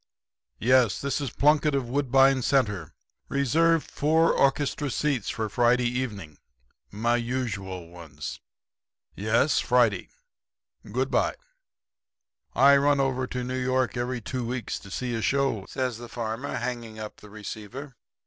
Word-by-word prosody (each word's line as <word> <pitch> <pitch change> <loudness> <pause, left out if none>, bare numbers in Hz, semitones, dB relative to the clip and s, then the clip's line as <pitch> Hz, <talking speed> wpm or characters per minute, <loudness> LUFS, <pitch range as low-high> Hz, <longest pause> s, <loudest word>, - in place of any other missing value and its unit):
Yes; 125 -3 +3
this 140 +1 -2
is 140 - -2
Plunkett, 150 +3 +3
of 135 -3 -1
Woodbine 135 0 +3
Centre. 105 - +1 0.4
Reserve 155 +4 +3
four 160 +3 +2
orchestra 140 +1 +1
seats 135 -4 -1
for 110 -1 -2
Friday 120 +3 +2
evening 110 - -3 0.5
my 120 - +1
usual 105 -8 -3
ones. 80 -4 -8 0.8
Yes; 115 +8 +2
Friday 120 -4 +2 0.8
good - - -1
bye.' - - +1 1.2
"'I 140 +1 +7
run 140 0 +3
over 130 -1 0
to 125 0 -4
New 125 +1 -4
York 130 0 0
every 120 0 -2
two 125 +3 -4
weeks 120 -1 -3
to 100 - -13
see 125 +5 -3
a 115 - -2
show,' 135 -8 0
says 125 -4 -2
the 120 -1 -9
farmer, 115 +3 -4
hanging 120 -2 -4
up 110 -1 -7
the 105 - -14
receiver. 110 +6 -8
125 Hz, 135 wpm, -26 LUFS, 110-135 Hz, 1.2 s, I